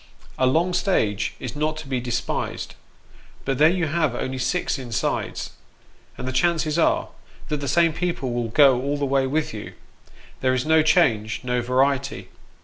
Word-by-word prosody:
A 130 Hz, -, +4 dB
long 170 Hz, +7 st, +2 dB
stage 110 Hz, -, 0 dB
is 130 Hz, 0 st, -6 dB
not 155 Hz, +1 st, -1 dB
to 155 Hz, -2 st, -8 dB
be 130 Hz, -2 st, -1 dB
despised, 120 Hz, -1 st, -3 dB, 0.7 s
but 135 Hz, -2 st, -1 dB
there 155 Hz, +2 st, +7 dB
you 175 Hz, -1 st, 0 dB
have 155 Hz, -4 st, 0 dB
only 130 Hz, +1 st, -3 dB
six 175 Hz, +2 st, -1 dB
insides, 120 Hz, -5 st, -3 dB, 0.7 s
and -, -, -5 dB
the -, -, -1 dB
chances 160 Hz, +2 st, +1 dB
are, -, -, +2 dB, 0.4 s
that 150 Hz, -, 0 dB
the 140 Hz, -, -4 dB
same 165 Hz, +4 st, +3 dB
people 130 Hz, -9 st, -2 dB
go 130 Hz, +1 st, +5 dB
all 140 Hz, +2 st, -1 dB
the 145 Hz, -, -1 dB
way 135 Hz, -1 st, +1 dB
with 155 Hz, 0 st, -1 dB
you 105 Hz, -, -7 dB, 0.7 s
there 130 Hz, 0 st, +2 dB
is 130 Hz, -, -1 dB
no 160 Hz, 0 st, +5 dB
change, 125 Hz, -, +2 dB
no 125 Hz, -1 st, 0 dB
variety. 135 Hz, +3 st, 0 dB
140 Hz, 165 wpm, -23 LUFS, 125-155 Hz, 0.7 s, there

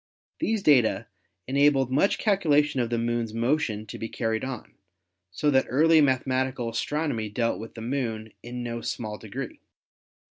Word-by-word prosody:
These 225 Hz, -10 st, 0 dB
data 125 Hz, -6 st, +4 dB, 0.4 s
enabled 135 Hz, -1 st, +3 dB
much 150 Hz, +9 st, +3 dB
calculation 150 Hz, -, +2 dB
of 120 Hz, -2 st, 0 dB
the 120 Hz, -, 0 dB
Moon's 115 Hz, -1 st, -1 dB
motion 115 Hz, -3 st, 0 dB
to -, -, -8 dB
be 115 Hz, -, -4 dB
car 115 Hz, -2 st, -2 dB
ried 110 Hz, 0 st, -1 dB
on, 130 Hz, -3 st, -6 dB, 0.6 s
so 145 Hz, +11 st, 0 dB
that 130 Hz, -1 st, +3 dB
early 160 Hz, +4 st, +5 dB
mathematical 130 Hz, -2 st, +1 dB
astronomy 115 Hz, -2 st, -2 dB
dealt 115 Hz, +2 st, -1 dB
with 110 Hz, +1 st, -9 dB
the 115 Hz, -, -7 dB
Moon 115 Hz, -3 st, -3 dB
in 120 Hz, +1 st, -6 dB
no 115 Hz, -1 st, -4 dB
small 110 Hz, -2 st, -4 dB
degree. -, -, -7 dB
125 Hz, 155 wpm, -26 LUFS, 115-145 Hz, 0.6 s, early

